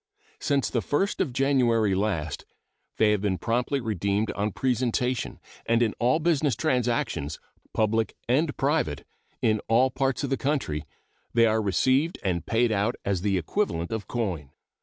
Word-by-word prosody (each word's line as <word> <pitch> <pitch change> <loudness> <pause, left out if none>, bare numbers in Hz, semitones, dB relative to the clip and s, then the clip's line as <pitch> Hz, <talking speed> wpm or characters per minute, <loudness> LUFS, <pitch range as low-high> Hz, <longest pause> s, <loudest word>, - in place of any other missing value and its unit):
Since 140 -2 0
the 120 - +1
1st 145 - 0
of 150 - 0
January 120 -6 +2
last 95 -7 -1 0.5
they 110 -1 +4
have 105 -2 +1
been 100 -3 0
promptly 120 +6 0
redeemed 105 -2 -1
on 105 +1 -2
presentation, 125 +1 -1 0.3
and 115 +1 +3
in 110 - 0
all 125 +5 +3
business 155 -4 +1
transactions, 120 - -1 0.3
public 110 +1 0
and 145 +5 +1
private, 135 - 0 0.4
in 110 -1 +2
all 125 +4 +4
parts 135 0 -1
of 140 - -2
the 135 - +2
country, 130 - -1 0.5
they 115 -1 +6
are 110 0 +2
received 130 - +2
and 90 -4 -1
paid 115 0 +2
out 105 +3 +1
as 100 -3 0
the 100 -1 +1
equivalent 85 - -1
of 110 -2 -3
coin. 90 - -3
115 Hz, 155 wpm, -26 LUFS, 100-135 Hz, 0.5 s, they